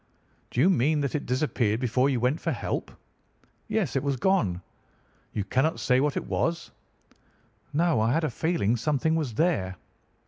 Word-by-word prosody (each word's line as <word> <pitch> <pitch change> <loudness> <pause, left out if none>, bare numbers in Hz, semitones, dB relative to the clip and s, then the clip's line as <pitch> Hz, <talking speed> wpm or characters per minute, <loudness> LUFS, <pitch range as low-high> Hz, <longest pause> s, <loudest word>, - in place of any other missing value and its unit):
"'Do - - -3
you 150 - +5
mean 155 -4 +3
that 140 -3 -2
it 150 - -3
disappeared 125 -4 0
before 125 +2 +2
you 130 -3 0
went 125 +6 0
for - - -1
help?' - - -3 0.8
"'Yes, 215 -7 -1
it 135 - +2
was 140 -1 0
gone.' 120 - +1 0.4
" - - -37
'You 105 - 0
cannot 135 - 0
say 125 0 +3
what 145 +1 0
it - - -3
was?' 170 0 -2 1.0
"'No, 160 -3 +2
I 115 +2 +2
had 160 +5 +1
a 155 - 0
feeling 160 - 0
something 150 +5 +1
was 145 -9 -2
there. 125 - +1
140 Hz, 175 wpm, -27 LUFS, 120-160 Hz, 1.0 s, you